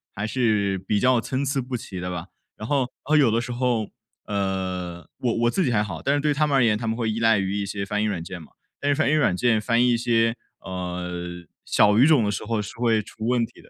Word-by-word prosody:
还 100 - -3
是 105 -5 +1
比 100 +2 -1
较 125 -1 +3
参 135 +3 -2
差 135 0 0
不 125 0 -4
齐 95 -4 -8
的 90 - -4
吧。 90 +1 -5 0.3
然 110 - -6
后 135 -4 +1 0.2
哦 155 +3 +2
有 145 -5 +5
的 115 +1 +2
时 120 +1 -4
候， 120 -3 0 0.4
呃， 95 -4 -3
我 120 -2 0
我 120 0 +3
自 190 - +1
己 125 - +1
还 105 -2 +2
好， 90 -6 -6
但 140 - +1
是 - - +1
对 150 -1 +2
他 150 +2 +1
们 145 - +1
而 130 - +4
言 110 -2 +3
他 115 - -4
们 110 - 0
会 115 -2 -1
依 110 - -3
赖 115 -1 +4
于 95 0 -1
一 - - -2
些 100 0 -4
翻 105 +1 -1
译 - - +1
软 95 -6 -2
件 90 0 -7
嘛。 80 - -14 0.3
但 145 - 0
是 145 - +3
翻 125 - +1
译 155 - +2
软 150 -12 +3
件 120 -2 +2
翻 115 +2 +2
译 125 - +3
一 - - +2
些， 115 -1 +2 0.3
呃， 90 -1 -5 0.2
小 105 0 +4
语 130 - +6
种 150 -7 +5
的 105 - 0
时 100 - -4
候 110 -1 -1
是 100 - -7
会 115 -2 +2
出 110 +2 -7
问 120 -1 +2
题 115 - -16
的。 - - -20
110 Hz, 295 characters per minute, -24 LUFS, 95-125 Hz, 0.4 s, 语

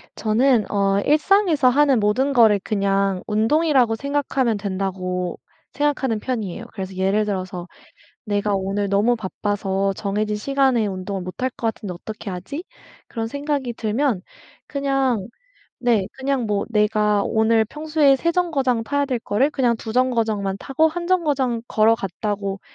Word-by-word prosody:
저는 230 +1 +2
어 200 -1 +2
'일상에서 310 -2 +4
하는 275 -2 +4
모든 255 +7 +1
거를 220 -5 +5
그냥 195 -2 0
운동이라고 240 +2 +2
생각하면 275 -3 0
된다.'고 185 -2 -3 0.3
생각하는 275 -5 0
편이에요. 225 -3 -4
그래서 190 -2 -6
예를 195 +3 +1
들어서 185 -3 -4 0.6
'내가 205 0 0
오늘 195 +1 -1
너무 205 +5 +2
바빠서 195 -1 -2
정해진 210 +2 -2
시간에 265 -1 +1
운동을 190 0 -4
못 185 +6 -8
할 260 - +1
것 235 - -5
같은데 205 -5 -7
어떻게 215 +3 -7
하지?' 235 - -6 0.4
그런 225 -1 -3
생각이 280 -2 -2
들면 220 -2 0 0.4
그냥 270 -7 0 0.5
네 230 -6 +2
그냥 265 -3 -1
뭐 205 -1 -1
내가 210 -1 +2
오늘 220 0 +2
평소에 300 +2 +2
3 335 +6 0
정거장 275 -10 0
타야 285 +2 0
될 255 -3 -1
거를 245 +9 +1
그냥 245 -5 +1
2 220 0 -7
정거장만 225 -6 +1
타고 315 +4 +1
1 345 +2 -5
정거장 285 -10 +1
걸어갔다고 205 -2 0
225 Hz, 305 characters per minute, -22 LUFS, 200-270 Hz, 0.6 s, 거를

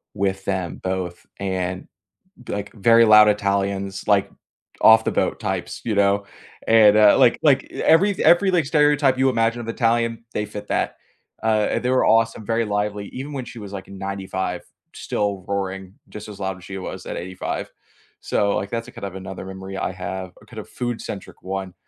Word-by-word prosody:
with 95 -1 -1
them 95 -4 -2
both, 95 -2 -4
and 95 -1 -3 0.6
b - - -7
like 100 0 -4
very 115 +2 +5
loud 105 -1 +8
Italians, 100 -1 -1
like 100 -2 +3 0.5
off 110 0 +7
the - - +1
boat - - 0
types, - - -3
you 110 - -1
know? 100 0 +2 0.4
And, 110 -2 +6
uh, 105 -1 +6
like - - +5
like - - +4
every 195 +6 +3
every 190 +3 +5
like 175 -4 +2
stereotype 145 -3 +3
you 135 0 +3
imagine 115 0 0
of 115 - -7
Italian, 115 0 0
they 105 - -1
fit 105 0 -8
that. - - -1 0.5
Uh, 110 -1 +1
they 125 - -1
were 130 - +3
awesome, 115 -2 +2
very 115 0 +1
lively, 105 -1 -2
even 135 +3 -6
when 130 - -4
she 120 - -10
was 100 -2 -9
like 95 -1 -7
95, 95 -2 -4 0.3
still 100 -3 -2
roaring 95 -1 -4
just 105 0 -9
as 100 -1 -10
loud 95 -1 -2
as 90 - -15
she 95 0 -7
was 95 - -7
at - - -5
85. 95 +2 -5 0.5
So, 100 0 0
like, 100 - -3
that's 115 0 -4
a - - -11
kind - - -9
of 100 -2 -6
another 95 0 -7
memory 95 0 -8
I 95 - -2
have, 95 0 -6
a - - -19
kind - - -12
of - - -7
food-centric 120 -5 -6
one 95 -1 -5
100 Hz, 185 wpm, -22 LUFS, 95-115 Hz, 0.6 s, loud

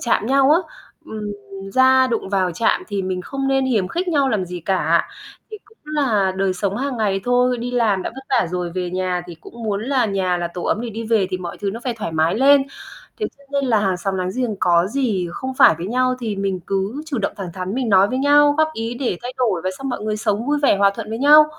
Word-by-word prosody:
chạm 225 -2 0
nhau 275 +1 +4
á. 320 - +6 0.5
Ừm, 210 -1 -5 0.4
ra 260 0 +5
đụng 230 -5 -2
vào 185 -3 0
chạm 225 - +1
thì 200 -2 -2
mình 185 -1 -3
không 270 +4 -3
nên 270 0 +2
hiềm 210 -8 +1
khích 360 +2 -2
nhau 285 -5 +2
làm 205 -6 0
gì 180 0 -7
cả. 185 +3 +1 0.4
Thì 430 - -6
cũng 430 +2 -25
là 250 -11 +1
đời 190 -1 0
sống 200 +1 -2
hàng 270 0 -2
ngày 200 -3 0
thôi. 245 0 +2
Đi 245 +1 -4
làm 220 -6 +1
đã - - -3
vất 265 0 -10
vả 240 -8 +2
rồi, 180 -1 -3
về 180 -1 -2
nhà 185 -1 -1
thì 175 - -9
cũng 235 0 -12
muốn 205 -1 -1
là 260 -3 +1
nhà 190 -3 0
là 170 0 -2
tổ 180 - -5
ấm 220 - 0
để 235 -1 -4
đi 225 +2 -6
về 220 -4 +2
thì 185 - -2
mọi 175 -2 -7
thứ 200 -1 -1
nó 230 - -7
phải 245 -2 -1
thoải 165 -6 -4
mái 160 +1 +1
lên. 275 +3 +5 0.6
Thế 425 - 0
cho 280 - -21
nên 280 -1 +1
là 225 -3 +3
hàng 190 -2 0
xóm 195 +2 -3
láng 185 0 -2
giềng 240 -5 -1
có 175 0 +3
gì 215 -7 -1
không 260 +7 -5
phải - - +7
với 175 - -4
nhau 255 +3 +1
thì 215 -4 -3
mình 195 -2 -2
cứ 195 +9 -2
chủ 280 -6 -3
động, 200 - -1
thẳng 190 -3 -6
thắn 185 +2 -4
mình 250 -2 -1
nói 195 0 +5
với 255 - -2
nhau, 290 +1 +5
góp 315 0 +4
ý 225 +2 -3
để 240 -9 -2
thay 245 - -5
đổi 220 -9 +1
và 185 - 0
xong 270 0 -4
mọi 245 - -3
người 215 0 -1
sống 210 +1 -1
vui 295 +1 +1
vẻ, 240 - +4
hòa 200 0 +4
thuận 225 -2 -6
với 225 - -3
nhau. 300 +3 +7
220 Hz, 260 wpm, -20 LUFS, 190-260 Hz, 0.6 s, phải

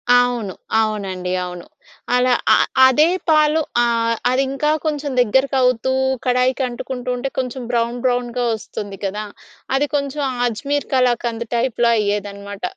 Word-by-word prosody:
అవును. 245 -6 +1 0.3
అవునండి. 195 -4 -3
అవును. 180 -1 -8 0.5
అలా 250 0 +3 0.2
అ - - +7 0.3
అదే 300 +5 +4 0.2
పాలు 305 0 +4 0.2
ఆహ్, 230 -1 +1
అది 255 +2 +2
ఇంకా 300 +3 0
కొంచెం 295 -2 -2
దగ్గరకవుతూ 260 +1 +2 0.3
కడాయికి 255 +1 +1
అంటుకుంటూ 250 +1 -6
ఉంటే, 265 +2 -3
కొంచెం 255 0 -3
బ్రౌన్ 235 0 0
బ్రౌన్‌గా 245 -1 0
వస్తుంది 205 -2 -6
కదా! 210 +2 -3 0.5
అది 280 +2 +2
కొంచెం 280 +1 -2 0.3
అజ్మీర్ 280 +6 -2
కళాకంద్ 240 -2 +1
టైప్‌లో 235 -1 +1
అయ్యేదనమాట. 200 -1 -3
245 Hz, 120 wpm, -20 LUFS, 215-265 Hz, 0.5 s, అ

